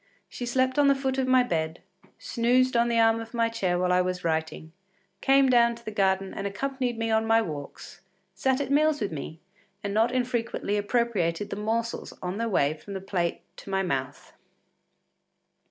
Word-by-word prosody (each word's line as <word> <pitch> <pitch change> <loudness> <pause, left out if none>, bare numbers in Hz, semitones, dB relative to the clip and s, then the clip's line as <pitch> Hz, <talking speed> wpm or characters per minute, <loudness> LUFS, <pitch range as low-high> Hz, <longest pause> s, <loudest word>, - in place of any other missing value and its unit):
She 245 - -6
slept 260 +2 +1
on 285 - +5
the 275 - +5
foot 270 -1 -1
of 260 - 0
my 255 -1 +5
bed, 160 -6 -2 0.4
snoozed 250 +2 +1
on 235 0 +3
the 235 - +1
arm 225 0 +4
of 225 +1 -9
my 230 -1 +2
chair 190 -6 -1
while 180 0 +1
I 180 - +4
was 180 0 -3
writing, 160 -1 -2 0.5
came 270 0 +5
down 235 -2 +4
to 235 0 -16
the 215 - -4
garden 195 -2 +1
and 195 - -3
accompanied 250 +3 -3
me 225 0 -1
on 220 0 +2
my 225 0 +5
walks, 150 -9 -7 0.3
sat 265 0 0
at 275 -1 -3
meals 300 +1 +3
with 205 -6 -2
me 155 +1 -7 0.4
and 200 -1 -3
not 225 +3 +3
infrequently 240 -4 -1
appropriated 205 -4 0
the - - -2
morsels 225 +2 -2
on 185 +3 -4
their 230 0 -1
way 145 -7 +2
from 195 +6 -10
my - - -3
plate 185 -3 -2 0.2
to - - -11
my 195 0 0
mouth. 135 -7 -4
225 Hz, 190 wpm, -27 LUFS, 185-245 Hz, 0.5 s, on